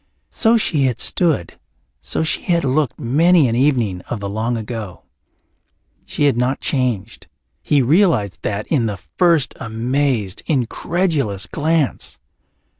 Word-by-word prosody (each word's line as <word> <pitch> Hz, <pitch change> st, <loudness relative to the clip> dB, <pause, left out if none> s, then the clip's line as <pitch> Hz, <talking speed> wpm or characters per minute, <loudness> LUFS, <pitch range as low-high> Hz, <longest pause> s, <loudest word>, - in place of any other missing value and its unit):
So 225 Hz, +1 st, +3 dB
she 155 Hz, -10 st, +1 dB
had 125 Hz, -3 st, -1 dB
stood, 160 Hz, -, 0 dB, 0.4 s
so -, -, -1 dB
she 160 Hz, -, 0 dB
had 170 Hz, -2 st, +1 dB
looked 140 Hz, +3 st, 0 dB
many 155 Hz, +4 st, +4 dB
an 115 Hz, -, -1 dB
evening 120 Hz, -9 st, +1 dB
of 120 Hz, -, -3 dB
the 100 Hz, -, -4 dB
long 115 Hz, +4 st, -2 dB
ago. 110 Hz, -4 st, -6 dB, 1.0 s
She -, -, -2 dB
had 140 Hz, -3 st, +4 dB
not 125 Hz, +3 st, 0 dB
changed; 125 Hz, -, -2 dB, 0.3 s
he 145 Hz, -3 st, +2 dB
realized 145 Hz, -, +2 dB
that 105 Hz, 0 st, -3 dB
in 130 Hz, -8 st, +1 dB
the 105 Hz, -2 st, -3 dB
first 155 Hz, -, +1 dB
amazed, 115 Hz, -2 st, -1 dB
incredulous 140 Hz, -, -1 dB
glance. 155 Hz, -2 st, -1 dB
130 Hz, 130 wpm, -19 LUFS, 110-155 Hz, 1.0 s, many